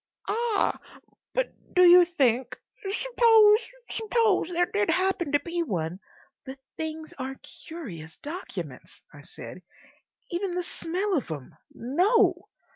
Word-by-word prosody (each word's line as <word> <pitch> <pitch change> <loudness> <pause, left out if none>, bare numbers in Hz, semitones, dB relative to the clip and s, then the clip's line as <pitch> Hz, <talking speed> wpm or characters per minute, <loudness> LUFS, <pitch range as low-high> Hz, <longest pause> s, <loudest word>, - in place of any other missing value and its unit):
"Ah!... 450 -1 0 0.6
But - - 0 0.2
do 365 - +6
you 355 0 +9
think—? 255 -7 +1 0.3
Suppose—suppose 450 -2 +3
there 355 0 +2
did 205 -8 -1
happen 370 -5 +1
to 290 - +3
be 345 +2 -3
one—" 180 - -3 0.4
"The 265 0 -8 0.2
things 315 0 -6
are 265 +1 -4 0.3
curious 185 - -8
documents," 340 +6 -8
I - - -12
said. - - -9 0.7
"Even 355 +1 -2
the 360 - -1
smell 370 +4 -3
of 275 - -2
'em.... 145 -5 -7 0.2
No!" 360 - +2
345 Hz, 120 wpm, -27 LUFS, 270-410 Hz, 0.7 s, you